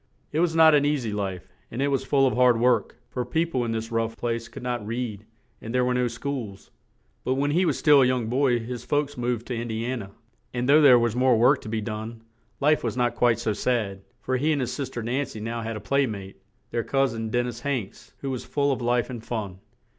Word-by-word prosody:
It 155 - -1
was 165 -1 +2
not 160 -1 +7
an 145 -1 +5
eas 145 -4 0
y 110 - -2
life, 95 -3 -4 0.2
and 120 - -6
it 140 +1 +1
was 135 -1 0
full 135 0 +3
of 130 - +2
hard 125 -2 +4
work, 120 -2 +2
for 125 - -2
peo 160 +7 0
ple 125 -4 0
in 115 - -2
this 115 +1 -3
rough 115 0 -1
place 115 -1 -2
could 120 - -10
not 125 -2 -2
read 110 -2 -4 0.3
and 115 +3 -5
there 125 0 +3
were 125 - +1
no 125 0 +1
schools; 115 -4 -5 0.5
but 130 - 0
when 145 +2 0
he 180 +5 +2
was - - +1
still 145 -3 +6
a - - +5
young 125 -2 0
boy 125 +1 +2
his 120 +1 -6
folks 145 -1 -1
moved 120 -1 -2
to - - -4
In 120 0 -3
di 110 0 -3
an 125 -1 -2
a, 100 -1 -10 0.4
and 120 +1 -1
though 150 +3 +6
there 135 -4 +8
was 120 -1 +1
more 125 -1 +4
work 125 +5 +4
to - - -8
be 110 0 -1
done, 110 +1 -6 0.4
life 150 +2 +3
was 115 0 -2
not 120 -1 +1
quite 120 -2 +3
so 115 -2 -1
sad, 105 -4 -1 0.2
for 130 0 -1
he 150 +5 +1
and 150 - +1
his 125 - -2
sis 140 -4 -4
ter 120 - -5
Nan 130 +4 -1
cy 125 -5 -9
now 115 +2 -4
had 115 0 -4
a - - -5
play 140 +6 +1
mate, 100 -3 -7 0.3
their 115 - -1
cous 135 -1 +1
in, 115 -1 -4
Den 120 +2 +1
nis 120 -1 -5
Hanks, 120 -6 -4
who 135 - -3
was 130 - -4
full 140 -1 0
of 130 - -2
life 120 0 +1
and 120 -3 -7
fun. 105 -6 -4
120 Hz, 260 wpm, -25 LUFS, 115-135 Hz, 0.5 s, there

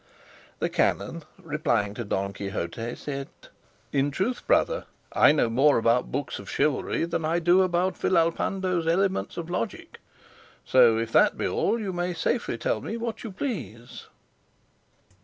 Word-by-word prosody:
The - - 0
canon, - - 0
replying 105 0 -1
to 120 - -5
Don 100 -1 -2
Quixote, 100 +4 -4
said, 140 -1 -5 0.6
"In 140 0 +1
truth, 190 - -2
brother, - - +2 0.3
I - - +6
know 150 -5 +2
more 135 +6 +4
about 115 +2 +2
books 135 -1 -3
of 100 - -10
chivalry 145 +3 0
than 170 -1 -2
I 160 +2 +1
do 175 +2 +4
about 185 0 +1
Villalpando's 175 0 +1
elements 190 +3 0
of 170 -1 -4
logic; 170 -10 -4 0.7
so 120 -3 +5
if 115 0 -2
that - - +4
be - - -2
all, 235 - 0
you 200 -4 -3
may 175 0 -2
safely 235 +8 -1
tell - - -1
me 225 - -4
what 230 -1 -4
you 225 - -6
please." 125 - -6
160 Hz, 150 wpm, -26 LUFS, 120-185 Hz, 0.7 s, I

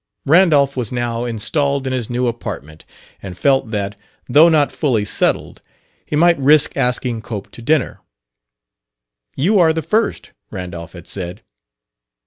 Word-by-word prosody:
Randolph 145 -3 +4
was 125 -5 -3
now 120 -1 -2
installed 140 +5 -1
in 130 - -2
his 125 -4 -3
new 125 +1 -1
apartment 80 -10 -6 0.4
and 95 -2 -8
felt 135 +1 +2
that, 100 -2 -3 0.3
though 150 +6 +6
not 150 -3 +2
fully 120 -9 0
settled, - - -1 0.5
he - - -2
might 170 +1 +4
risk 145 +2 +4
asking 125 -3 -1
Cope 110 -3 -7
to - - -11
dinner. 150 +4 0 1.4
"You 195 +9 +2
are 160 -2 +4
the 160 0 -3
first," 220 +9 -1 0.2
Randolph 90 -4 -7
had 85 -2 -11
said. 90 -2 -6
125 Hz, 140 wpm, -18 LUFS, 110-150 Hz, 1.4 s, though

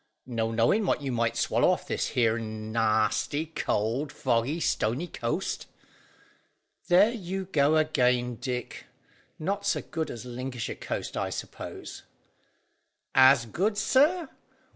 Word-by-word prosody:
"No 115 -3 -1
knowing 120 - +2
what 145 - +1
you 135 - -2
might 115 -1 0
swallow - - +2
off - - 0
this - - -1
here 115 -2 +1
nasty, 110 +6 0
cold, 135 -2 -1
foggy, 130 +5 0
stony 125 +1 0
coast." 165 +2 -3 1.2
"There 195 +5 +6
you 190 -4 -4
go 155 -3 +3
again, 125 -6 +2
Dick; 125 0 -5 0.5
not 200 +5 -2
so 200 - +1
good 160 -1 -4
as 120 +1 -7
Lincolnshire 125 -1 -4
coast, - - -5
I - - -1
suppose?" - - -7 1.1
"As 130 -2 +6
good, 200 - -1
sir? 300 - +3
130 Hz, 120 wpm, -28 LUFS, 115-175 Hz, 1.2 s, There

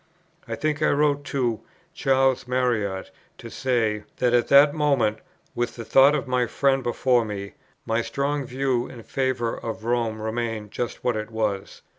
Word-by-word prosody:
I 115 - -3
think 155 +2 -1
I 155 - +3
wrote 145 0 +2
to 120 -7 -1 0.3
Charles 135 -2 +2
Marriott 115 -7 -1 0.3
to - - -10
say, 115 -5 0 0.2
that 125 -1 +1
at 120 -1 +3
that 145 +1 +7
moment, 140 -8 +1 0.3
with 120 0 -2
the 115 - -7
thought 135 +5 +6
of 140 - -3
my 125 -1 +1
friend 135 +3 +1
before 120 0 +2
me, 100 -2 -6 0.3
my 115 +1 +1
strong 140 +4 -2
view 130 -1 -1
in 120 -3 -11
favour 130 -3 -1
of 110 -1 -6
Rome 115 -2 -1
remained 110 -1 -3
just 120 - -4
what 125 - +1
it 110 0 -4
was. 110 -3 -3
120 Hz, 165 wpm, -24 LUFS, 110-135 Hz, 0.3 s, that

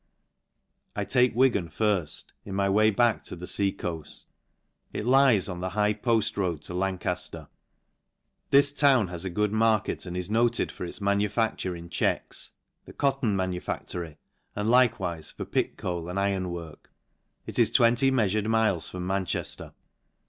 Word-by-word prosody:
I 105 - -2
take 125 +3 +3
JVtgan 120 -10 +2
firft, 95 -5 0 0.2
in 95 - -6
my 100 0 +1
way 105 +2 +4
back 115 0 +2
to - - -6
the 90 +1 -8
fea 100 +1 +2
coaft: 85 -5 -7 0.7
it - - -4
lies 130 -5 +4
on 90 -3 -5
the 95 +1 -3
high 105 0 +3
poft 110 0 0
road 85 -6 -1
to - - -8
Lancq/ler. 90 -3 -3 1.0
This 140 +1 +6
town 135 -8 +4
has 90 +1 -4
a - - -1
good 105 +3 0
market, 110 -3 +1
and 90 0 -5
is 90 - -3
noted 115 +3 +1
for - - -6
its 85 - -7
manufacture 100 -1 0
in 85 0 -9
checks, - - -2 0.3
the - - -12
cotton 135 -7 0
manufactory, 90 -3 -4 0.4
and 105 +2 -1
likewife 100 -10 +2
for - - -4
pit - - -1
coal, 85 -2 -4
and 95 +2 -2
iron 100 -2 0
work. 85 -3 -8 0.6
It - - -3
is - - +5
20 120 +3 +4
meafured 110 -5 +1
miles 110 -6 +1
from 90 -1 -5
Manchester. 95 -1 -2
100 Hz, 155 wpm, -27 LUFS, 90-115 Hz, 1.0 s, This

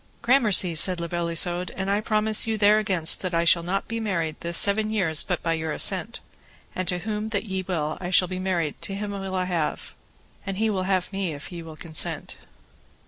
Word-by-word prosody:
Gramercy, 215 -9 +4
said 175 +2 +4
La 170 - -3
Beale 170 0 -3
Isoud, 175 +2 +1
and 190 +1 -2
I 205 +1 +1
promise 215 0 +2
you 220 -1 0
there 210 +1 +5
against 185 -6 +2
that 185 -2 -3
I 165 - +2
shall 170 0 +4
not 185 +4 -3
be 230 0 -3
married 170 -8 -2
this 170 0 +1
seven 215 +2 +4
years 185 -8 +2
but 180 - -3
by 165 - 0
your 160 -1 -3
assent; 195 +7 -1 0.5
and 185 -1 -4
to 180 - 0
whom 210 +3 -4
that 210 -2 -2
ye 190 -2 -3
will 160 -5 -3
I 175 - -4
shall 180 0 +4
be 185 +1 -5
married 175 -5 -2
to 195 - -5
him 205 +1 -4
will 195 -1 -5
I 185 0 0
have, 170 -4 -3 0.5
and 195 -1 -5
he 220 +1 +1
will 185 -2 -2
have 185 0 0
me 195 -4 -2
if 145 +4 -9
ye 170 -1 -7
will 160 -1 -11
consent. 160 -1 -3
185 Hz, 220 wpm, -24 LUFS, 170-205 Hz, 0.5 s, there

